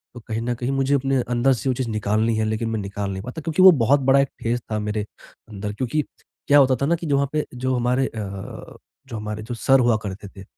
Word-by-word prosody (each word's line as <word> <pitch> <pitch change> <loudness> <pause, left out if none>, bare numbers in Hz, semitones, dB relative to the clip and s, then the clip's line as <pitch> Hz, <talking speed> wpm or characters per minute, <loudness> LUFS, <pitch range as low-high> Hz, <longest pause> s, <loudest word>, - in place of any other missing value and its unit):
तो - - -7
कहीं 110 0 -2
न 120 +1 -1
कहीं 120 +3 -3
मुझे 135 +1 +1
अपने 135 -1 +1
अंदर 125 +2 +3
से 130 +2 -2
वो - - +2
चीज़ 125 -2 -3
निकालनी 110 +1 0
है 110 - +1
लेकिन 110 +1 -2
मैं 110 -1 -2
निकाल 100 0 -4
नहीं 95 0 -5
पाता, 125 +7 -7
क्योंकि 160 +3 0
वो 190 0 +10
बहुत 140 -2 +3
बड़ा 135 +1 +4
एक 135 -1 +2
फ़ेज़ 120 +1 0
था 110 - 0
मेरे 105 0 -2 0.4
अंदर 105 -1 -5
क्योंकि 130 +7 -1 0.4
क्या 145 0 +6
होता 130 -1 +4
था - - +2
ना 165 +4 +2
कि 170 0 -6
जो 140 - +2
वहाँ 140 0 +1
पे 150 -1 0
जो 130 +1 -1
हमारे 125 +2 +1
अ, 100 -3 -7 0.3
जो 120 - -7
हमारे 105 0 -5
जो 120 +3 -6
सर 135 +3 +3
हुआ 120 -2 +3
करते 100 +1 -6
थे, 95 0 -12
120 Hz, 255 wpm, -22 LUFS, 110-135 Hz, 0.4 s, वो